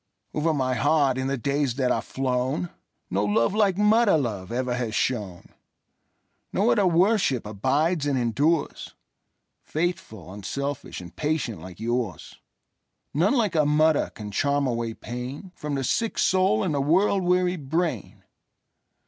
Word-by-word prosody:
Over 155 +2 +1
my 130 -4 0
heart, 140 0 +2
in 130 - -1
the 135 0 -1
days 140 0 0
that 130 -2 +1
are - - +1
flown, 130 +5 -2 0.4
No 100 +2 +1
love 105 - +2
like 205 -3 +2
mother 210 -2 +4
love 105 -9 -3
ever 125 +1 -1
has 120 -4 -2
shone; 105 -8 -2 1.0
No - - +2
other 150 +10 +3
worship 175 - +2
abides 140 - 0
and 140 -2 +1
endures,—Faithful, 130 - -3
unselfish, 140 +5 -5
and 85 -1 -12
patient 125 - -2
like 90 +1 -10
yours:None 120 - -4
like 215 -7 +1
a 155 -2 +3
mother 150 +1 +3
can 105 -1 -8
charm 140 +6 +1
away 115 -3 -2
painFrom 140 - -6
the 135 - -2
sick 225 - -1
soul 185 - +3
and - - -1
the 140 - 0
world 190 +7 +3
weary 180 0 +2
brain. 155 - -3
140 Hz, 135 wpm, -25 LUFS, 120-165 Hz, 1.0 s, mother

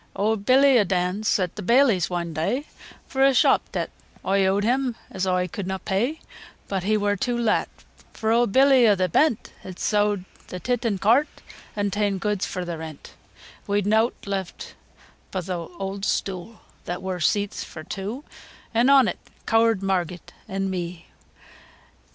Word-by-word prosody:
IV. - - -32
Owd 215 -1 0
Billy 265 +1 +6
o' - - +5
Dans 185 +2 -1
sent 180 -3 +1
th' 210 - -6
baileys 235 - +3
one 170 -2 -3
day, 245 - -1 0.4
Fur 265 0 0
a 270 -1 +5
shop - - +3
deebt - - -3 0.3
oi 195 +1 +2
eawd 195 +1 +2
him, 250 +1 +1 0.2
as 190 0 -2
oi 180 0 +1
could 185 +2 -6
na 190 0 -2
pay, 230 +12 -1 0.5
But 195 -2 -2
he 215 +4 +1
wur 205 0 +1
too 240 +5 -1
lat, 230 -3 +1 0.4
fur 220 0 -1
owd 235 -2 +3
Billy 265 0 +6
o' 205 - +5
th' 185 -2 -1
Bent, 275 - +1
Had 185 -1 -9
sowd 205 -2 +1 0.2
th' 180 - -8
tit 245 -1 0
an' 205 -3 0
cart, 235 +10 +4 0.5
an' 205 -1 -1
ta'en 205 0 0
goods 205 +1 -1
fur 180 -1 -4
th' 170 -2 -5
rent, 160 -3 -9 0.5
We'd 205 -1 +1
neawt 220 +3 +3
left 195 -2 -5 0.6
bo' 185 - -3
th' 180 +2 -7 0.3
owd 195 0 -4
stoo', 195 +2 -2 0.3
That 175 +1 -5
wur 185 -1 -3
seeats 200 +5 0
fur 155 - -9
two, 210 - -5 0.5
An' 235 +3 +3
on 275 -2 +6
it - - -3 0.3
ceawred 225 -3 +3
Marget 180 -3 -2
an' 195 0 -2
me. 175 -2 -5
200 Hz, 175 wpm, -24 LUFS, 185-230 Hz, 0.6 s, Billy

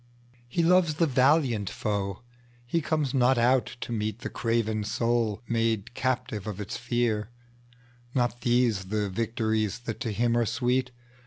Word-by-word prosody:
He 170 +8 0
loves 175 -2 +4
the 165 - +3
valiant 130 - +3
foe; 100 0 -3 0.4
he 165 +7 0
comes 155 -3 0
not 130 -1 +4
out 120 +1 +2
to - - -5
meetThe 110 +3 -3
craven 115 -2 0
soul 115 0 0
made 115 -1 0
captive 125 -5 -2
of 105 -2 -5
its 105 - -5
fear:Not 120 +1 -3
these 120 -5 +2
the 105 0 -1
victories 110 0 -1
that 115 -2 -5
to 120 -4 -2
him 115 +3 +1
are 120 -1 +2
sweet! 125 +2 0
120 Hz, 140 wpm, -27 LUFS, 110-125 Hz, 0.4 s, loves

